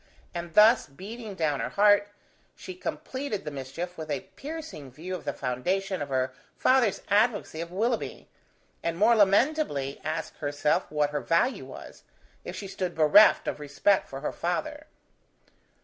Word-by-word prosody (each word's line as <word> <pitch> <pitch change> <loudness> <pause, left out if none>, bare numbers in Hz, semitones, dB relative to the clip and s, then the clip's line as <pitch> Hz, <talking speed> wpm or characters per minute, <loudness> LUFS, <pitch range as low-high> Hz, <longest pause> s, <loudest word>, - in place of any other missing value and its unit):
And 170 -1 -6
thus 220 0 +6
beating 205 - -8
down 150 -5 0
her - - -2
heart, 205 0 +4 0.5
she 370 - -8
completed 270 - -5
the 150 - -4
mischief 145 +6 -6
with 155 -1 -6
a 140 -3 -1
piercing 300 - -7
view 165 +8 -7
of 185 - -6
the - - 0
foundation 180 +9 -2
of 145 - -4
her 130 -1 0 0.2
father's 255 -6 +3
advocacy 205 -5 +1
of 170 0 -6
Willoughby, 225 +5 -2 0.5
and 170 0 -2
more 220 +5 +5
lamentably 200 - +2
asked 155 - -4
herself 145 0 0
what 150 -1 +1
her 145 -1 -2
value 170 +11 +1
was, - - -11 0.4
if - - -7
she 200 - -6
stood 190 -2 -4
bereft 160 +7 +6
of - - -2
respect 150 +7 +1
for 135 0 -7
her 150 - -2
father. 170 -2 -3
180 Hz, 155 wpm, -27 LUFS, 150-210 Hz, 0.5 s, thus